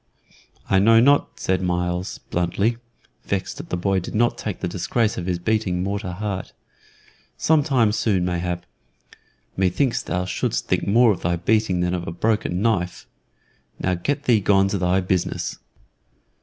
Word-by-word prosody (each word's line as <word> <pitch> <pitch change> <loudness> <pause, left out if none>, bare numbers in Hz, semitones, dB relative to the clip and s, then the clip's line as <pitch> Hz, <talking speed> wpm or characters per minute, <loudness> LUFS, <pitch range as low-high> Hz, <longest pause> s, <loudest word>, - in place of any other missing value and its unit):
"I 95 - +3
know 115 +3 +6
not," 140 +4 +3
said 95 0 0
Myles, 90 0 -2
bluntly, 100 +7 0 0.5
vexed - - -3
that - - -9
the 90 - -1
boy 95 +2 +1
did 90 - -7
not 120 +2 +2
take 105 -4 -5
the 95 - -2
disgrace 105 +5 0
of 90 - -5
his 90 -1 0
beating 90 -1 0
more 100 +1 -1
to 90 -4 -5
heart. 100 0 -4 0.8
"Some 160 -1 +3
time 130 -7 +2
soon, 100 -4 +1
mayhap. 90 0 -2 0.9
Me 95 -1 +2
thinks 130 +7 0
thou 90 +1 -2
shouldst 90 -8 -2
think - - 0
more 115 +3 +5
of 95 - -3
thy 85 0 0
beating 95 +1 +1
than 90 0 0
of 90 -1 -3
a - - -3
broken 100 0 0
knife. 90 -6 0 0.7
Now 90 - 0
get 140 +12 -2
thee 120 -6 +4
gone 95 0 +3
to 100 - -1
thy 90 +1 +2
business." 90 -1 -2
95 Hz, 170 wpm, -22 LUFS, 90-110 Hz, 0.9 s, know